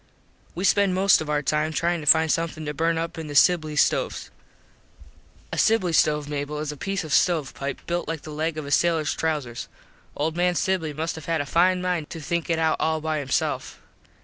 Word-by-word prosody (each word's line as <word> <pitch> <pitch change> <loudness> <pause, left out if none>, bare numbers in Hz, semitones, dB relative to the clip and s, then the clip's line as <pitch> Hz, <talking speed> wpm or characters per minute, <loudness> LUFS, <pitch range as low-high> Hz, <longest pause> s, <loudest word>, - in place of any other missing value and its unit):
We 180 - -4
spent 200 -1 +3
most 190 -1 +4
of 155 - -5
our 150 0 0
time 150 +2 0
tryin 170 +1 0
to 150 - -9
find 160 +1 +6
somethin 165 -1 -2
to 150 - -3
burn 165 +3 0
up 165 0 -4
in 160 - -6
the 145 - -7
Sibly 155 -1 +4
stoves. - - 0 1.2
A - - -1
sibly 215 -6 +2
stove, 150 -2 +2
Mable, 145 0 -4
is 150 0 -3
a - - -8
piece 195 +5 -3
of 155 -2 -4
stove 165 -7 +2
pipe 140 0 -5
built 175 0 -2
like 160 -1 -4
the 155 - -8
leg 155 +1 -2
of 155 - -4
a 140 - -7
sailurs 160 -3 +2
trowsers. 145 -8 -3 0.5
Old 155 +2 -1
man 175 0 +1
Sibly 175 -2 0
must 160 +3 -3
have 160 - -9
had 165 -1 0
a 145 - -2
fine 180 +5 +2
mind 175 -4 -2
to 165 - -7
think 170 +3 -3
it 165 - +1
out 160 -1 +1
all 160 0 0
by 155 0 -2
hisself. 135 -2 -2
160 Hz, 215 wpm, -24 LUFS, 150-170 Hz, 1.2 s, find